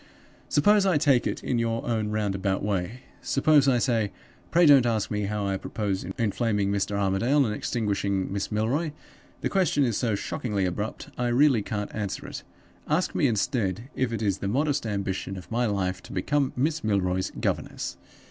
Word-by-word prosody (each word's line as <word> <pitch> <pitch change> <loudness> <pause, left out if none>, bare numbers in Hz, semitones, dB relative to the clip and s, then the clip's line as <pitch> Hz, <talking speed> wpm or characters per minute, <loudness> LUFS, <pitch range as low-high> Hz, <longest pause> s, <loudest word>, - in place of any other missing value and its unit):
Suppose 205 +7 +4
I 190 -5 +3
take 140 -5 +3
it - - -4
in 125 - 0
your 115 0 -1
own 110 -3 -1
roundabout 100 -3 -1
way? 100 +4 -2 0.2
Suppose 145 0 +3
I 130 -2 +4
say, 115 -4 +1 0.4
'Pray 175 +1 +5
don't 140 -5 +7
ask 110 -3 0
me 105 -1 -1
how 105 0 -2
I 95 -1 0
propose 100 -1 -3
inflaming 105 -2 0
Mr. 100 0 -1
Armadale 100 +9 +2
and 105 - -1
extinguishing 100 -4 -1
Miss 100 +2 -3
Milroy; 130 +9 0 0.5
the - - 0
question 185 -7 +2
is 120 -5 +1
so 115 -4 0
shockingly 100 -1 -2
abrupt 105 +4 -4
I 125 - +1
really 125 -1 +4
can't 105 0 -4
answer 100 -3 -4
it. - - -6 0.5
Ask 160 +5 +1
me, 145 - +2
instead, 115 0 -1
if 130 -2 0
it 115 -1 -2
is 100 -2 0
the 100 - -3
modest 140 +3 0
ambition 95 -2 -3
of 90 - -11
my 120 +1 +1
life 95 -3 -1
to - - -13
become 140 +8 0
Miss 150 +5 0
Milroy's 95 -3 0
governess? - - -2
110 Hz, 175 wpm, -26 LUFS, 100-130 Hz, 0.5 s, don't